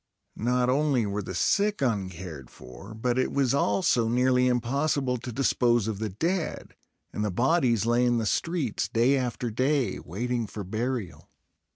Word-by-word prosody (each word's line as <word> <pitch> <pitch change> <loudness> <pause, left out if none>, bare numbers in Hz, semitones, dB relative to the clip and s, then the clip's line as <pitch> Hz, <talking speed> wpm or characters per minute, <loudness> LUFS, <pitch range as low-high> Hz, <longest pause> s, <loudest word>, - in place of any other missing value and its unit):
Not 125 +2 +1
only 135 -2 +2
were 100 +1 -2
the 95 -2 -6
sick 205 - +1
uncared 95 - -3
for, 65 - -12
but 120 +3 0
it 130 - 0
was 135 -3 +1
also 115 -2 +2
nearly 125 +2 +3
impossible 125 +2 0
to 120 +1 -7
dispose 120 -3 +2
of 105 -3 -3
the 110 -1 -2
dead; 165 - -3 0.4
and 105 - -2
the 105 - 0
bodies 120 - +2
lay 120 +1 +2
in 120 -1 +2
the 115 - -1
streets 140 - -1
day 120 +4 +3
after 125 -2 -2
day, 130 -2 0
waiting 120 +6 -3
for 105 0 -7
burial. 110 - -4
120 Hz, 160 wpm, -27 LUFS, 105-130 Hz, 0.4 s, nearly